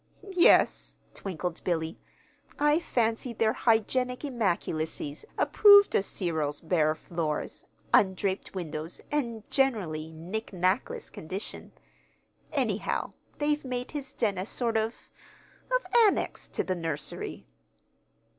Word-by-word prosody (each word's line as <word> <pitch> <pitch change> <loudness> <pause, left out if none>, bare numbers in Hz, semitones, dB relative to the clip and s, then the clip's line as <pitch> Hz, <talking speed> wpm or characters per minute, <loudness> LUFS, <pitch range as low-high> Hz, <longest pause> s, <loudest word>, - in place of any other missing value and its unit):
"Yes," 350 - +4 0.2
twinkled 180 -2 -4
Billy. 165 -2 -1 0.6
"I 295 +2 +4
fancy 235 -5 0
their 220 -1 +2
Hygienic 250 +4 +1
Immaculacies 170 - -2
approved 405 -1 +7
of - - +3
Cyril's 160 -7 -1
bare 160 -2 +2
floors, 160 -2 -3 0.3
undraped 190 0 +2
windows, 160 -2 -4
and 235 -7 -2
generally 180 - 0
knick 180 +8 -5
knackless 185 +2 0
condition. 185 +6 -6 0.8
Anyhow, - - -1 0.2
they've 295 0 0
made 250 -1 -4
his 285 -3 -5
den 205 -5 0
a 190 - -3
sort 235 -2 -1
of 220 +1 -2 0.6
of - - +1 0.2
annex 400 - -1
to - - -2
the 185 - -1
nursery." 160 -3 -4
200 Hz, 110 wpm, -28 LUFS, 165-250 Hz, 0.8 s, approved